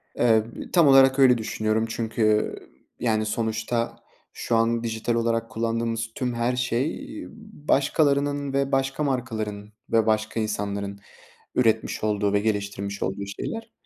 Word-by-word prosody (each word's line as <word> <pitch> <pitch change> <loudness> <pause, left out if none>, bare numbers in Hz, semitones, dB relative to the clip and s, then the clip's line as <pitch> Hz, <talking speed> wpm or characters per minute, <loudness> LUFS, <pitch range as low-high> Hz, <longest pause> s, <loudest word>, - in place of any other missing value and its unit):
Eee, 110 -3 +4 0.3
tam 170 -5 +6
olarak 135 0 +6
öyle 125 -2 +6
düşünüyorum 110 0 -1
çünkü, 110 -2 +1 0.4
yani 110 -2 +1
sonuçta 110 +1 -2 0.3
şu 115 - -1
an 115 +1 +2
dijital 115 +1 -1
olarak 115 0 0
kullandığımız 115 0 -1
tüm 125 -2 -2
her 120 +1 0
şey, 125 +4 -1 0.2
eee, - - -8 0.4
başkalarının 140 0 +2
ve 140 0 0
başka 135 +2 0
markaların 110 -6 -3 0.2
ve 115 -1 +4
başka 110 0 0
insanların 100 -2 -3 0.6
üretmiş 110 -4 +1
olduğu 105 -1 +1
ve 100 - +4
geliştirmiş 100 -1 -2
olduğu 100 +1 -3
şeyler 225 - -6
115 Hz, 130 wpm, -25 LUFS, 110-125 Hz, 0.6 s, tam